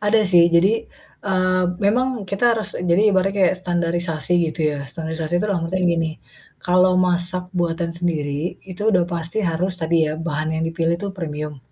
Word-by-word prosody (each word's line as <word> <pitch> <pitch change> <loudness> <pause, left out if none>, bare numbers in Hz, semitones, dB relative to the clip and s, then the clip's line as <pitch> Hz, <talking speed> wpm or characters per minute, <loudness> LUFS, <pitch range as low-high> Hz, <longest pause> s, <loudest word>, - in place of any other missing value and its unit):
Ada 210 +1 +3
sih. 175 -3 +5
Jadi, 170 +5 +4 0.5
eee, 185 -2 +1 0.2
memang 245 +2 +1
kita 200 +5 -2
harus 215 -2 -3
jadi 180 +4 +3
ibaratnya 190 +1 +1
kayak 185 - +4
standarisasi 175 -2 -1 0.2
gitu 160 +1 -7
ya. 145 - -4
Standarisasi 160 +1 -4
itu 195 - -1
dalam 170 -4 -1
artian 185 +1 -1
gini, 165 -2 +1 0.5
kalau 180 +1 +3
masak 180 0 0
buatan 170 -1 -1
sendiri 160 -2 -2
itu 190 +1 -8
udah 180 -3 +3
pasti 170 +4 -3
harus 175 +3 0
tadi 165 -1 +1
ya, 155 - -2
bahan 160 -1 -2
yang - - 0
dipilih 165 0 0
tuh 200 - -2
premium. 150 -4 -5
175 Hz, 170 wpm, -21 LUFS, 165-185 Hz, 0.5 s, sih